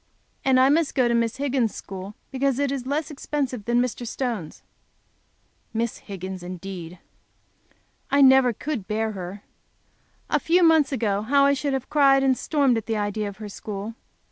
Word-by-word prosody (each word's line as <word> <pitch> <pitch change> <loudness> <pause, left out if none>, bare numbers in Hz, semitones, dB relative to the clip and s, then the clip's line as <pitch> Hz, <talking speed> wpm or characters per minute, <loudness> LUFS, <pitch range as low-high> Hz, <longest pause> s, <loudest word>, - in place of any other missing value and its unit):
And 260 -1 +4
I 260 +1 +6
must 315 +1 +2
go 255 -3 +3
to 235 - +1
Miss 230 -1 +1
Higgins' 265 -5 0
school 195 +2 -8 0.2
because 270 -1 0
it 280 -1 0
is 265 -2 -4
less 300 +3 -1
expensive 270 -6 -3
than 240 0 +2
Mr. 245 -1 -2
Stone's. 230 - -4 1.1
Miss 230 0 -1
Higgins, 190 -2 -7
indeed! 180 -1 -7 1.1
I 280 +1 +3
never 265 -2 +6
could 235 -3 -4
bear 220 +1 -1
her! 195 0 -7 0.8
A - - +1
few 350 +2 +3
months 320 -3 +5
ago, 210 -6 0
how 275 +5 +3
I 280 - +4
should 280 0 -1
have 265 -2 -2
cried 275 -2 +5
and 265 -1 +3
stormed 275 -4 +1
at 220 - -13
the 225 -1 -1
idea 205 0 -2
of 200 - -11
her 215 -1 -7
school. 205 +2 -6
245 Hz, 170 wpm, -24 LUFS, 205-275 Hz, 1.1 s, I